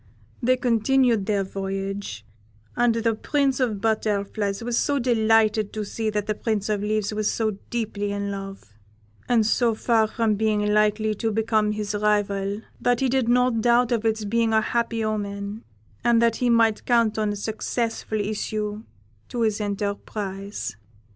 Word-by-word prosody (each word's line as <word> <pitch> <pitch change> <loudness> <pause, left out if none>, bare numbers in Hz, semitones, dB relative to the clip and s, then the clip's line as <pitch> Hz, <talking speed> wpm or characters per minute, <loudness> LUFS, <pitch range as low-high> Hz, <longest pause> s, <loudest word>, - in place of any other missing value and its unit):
They 255 +2 +3
continued 240 -2 +2
their 200 -2 +1
voyage, 195 - -4 0.5
and 240 -1 +3
the 230 0 +1
Prince 275 +4 0
of 255 -2 +2
the 215 - -4
Butterflies 205 -1 -1
was 240 0 -1
so 285 -1 +1
delighted 220 -4 +2
to 215 -1 -3
see 220 +2 -2
that 210 -1 -2
the 215 - 0
Prince 215 -1 -2
of 210 -1 0
Leaves 210 0 -1
was 210 0 0
so 215 -3 -1
deeply 210 -3 -2
in 200 0 -2
love, 195 - -8 0.6
and 230 -3 +4
so 230 +1 +2
far 225 -1 +2
from 220 0 0
being 210 0 +1
likely 215 +1 +2
to 225 +2 -2
become 215 -1 +1
his 210 -1 -3
rival, 205 -1 0 0.2
that 245 -1 +2
he 265 - +1
did 255 -2 +1
not 250 -2 +3
doubt 240 +1 +3
of 230 -2 +1
its 220 -1 0
being 230 +1 +1
a 220 - +4
happy 230 0 -1
omen, 205 0 -3 0.4
and 235 -1 +4
that 230 -1 +3
he 250 - +1
might 225 -2 +3
count 230 -3 +3
on 210 -1 +1
a - - -3
successful 220 +1 -2
issue 210 0 -3 0.5
to 240 - -3
his 215 -2 +1
enterprise. 200 - -4
215 Hz, 165 wpm, -24 LUFS, 205-230 Hz, 0.6 s, and